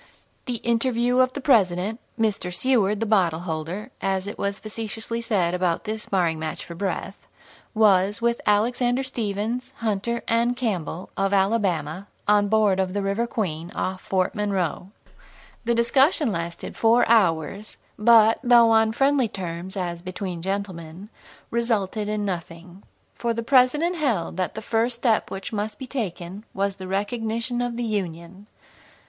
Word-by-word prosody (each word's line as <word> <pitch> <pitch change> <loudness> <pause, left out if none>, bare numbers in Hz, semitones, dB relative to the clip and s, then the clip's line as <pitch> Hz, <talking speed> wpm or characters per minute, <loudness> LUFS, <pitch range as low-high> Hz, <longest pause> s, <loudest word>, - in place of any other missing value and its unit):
The 245 - -2
interview 240 +1 +1
of 255 0 +3
the 285 - -5
President, 210 -4 +2 0.2
Mr. 210 -5 0
Seward 210 0 +1
the - - +1
"bottle 180 -7 +2
holder" 175 +7 -4
as 190 -1 0
it 205 - -7
was 200 0 -1
facetiously 225 +1 -4
said 190 -7 +1
about 180 -2 0
this 220 0 -3
sparring 175 -6 0
match 155 0 -4
for 170 - -8
breath 190 +2 -4 0.5
was 205 -2 +4
with 235 0 0
Alexander 245 +5 +2
Stephens, 230 -1 -3
Hunter, 230 +1 -1
and 235 +2 +2
Campbell, 185 - -3
of 195 0 0
Alabama, 190 -4 0 0.2
on 205 0 +4
board 210 -2 +3
of 185 -1 0
the 200 0 -1
River 200 +4 0
Queen, 175 -7 -3
off 185 0 -2
Fort 185 -1 0
Monroe. 195 -4 -2 0.8
The 235 0 +2
discussion 265 - +3
lasted 170 -2 -5
four 230 +2 +4
hours, 195 -2 +1 0.2
but, 225 0 +6
though 240 -2 +6
on 220 0 +4
friendly 270 0 +3
terms, 185 -1 -6
as 175 -2 -3
"between 185 -1 -5
gentlemen," 190 -1 -5 0.4
resulted 220 -3 0
in 210 -1 -1
nothing. 175 0 -6 0.3
For 235 -1 -2
the 230 - -3
President 280 +8 +3
held 230 - 0
that 185 -1 -2
the - - -6
first 235 +1 0
step 235 -2 +1
which 195 +4 -6
must 210 0 -3
be 265 - -7
taken 200 -6 -5
was 200 0 -1
the 185 -1 -7
recognition 225 +4 -1
of 245 -1 -2
the 240 - -2
Union. 190 -2 -4
205 Hz, 150 wpm, -24 LUFS, 185-235 Hz, 0.8 s, but